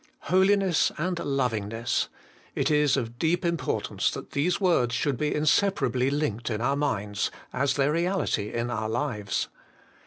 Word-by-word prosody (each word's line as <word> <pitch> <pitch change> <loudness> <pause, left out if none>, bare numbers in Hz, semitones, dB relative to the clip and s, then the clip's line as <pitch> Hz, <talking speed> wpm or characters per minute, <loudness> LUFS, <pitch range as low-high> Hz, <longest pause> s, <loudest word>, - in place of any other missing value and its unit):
Holiness 190 -2 +4
and 175 +2 -1
lovingness 115 -5 -1 0.5
it - - +1
is 150 -2 +3
of 120 -2 -4
deep 170 +2 +1
import 170 -6 -1
ance - - +1
that - - -7
these 165 +6 +1
words 125 - +2
should 140 -1 -1
he 150 - +1
inseparably 150 - +2
linked 130 -6 -1
in 110 -2 -2
our 130 +4 +1
minds, 105 -8 -1 0.2
as 140 +1 +1
their 140 +1 +2
reality 170 - 0
in 120 +1 -2
our 110 -2 -2
lives. 110 -6 -1
140 Hz, 150 wpm, -27 LUFS, 115-165 Hz, 0.5 s, Holiness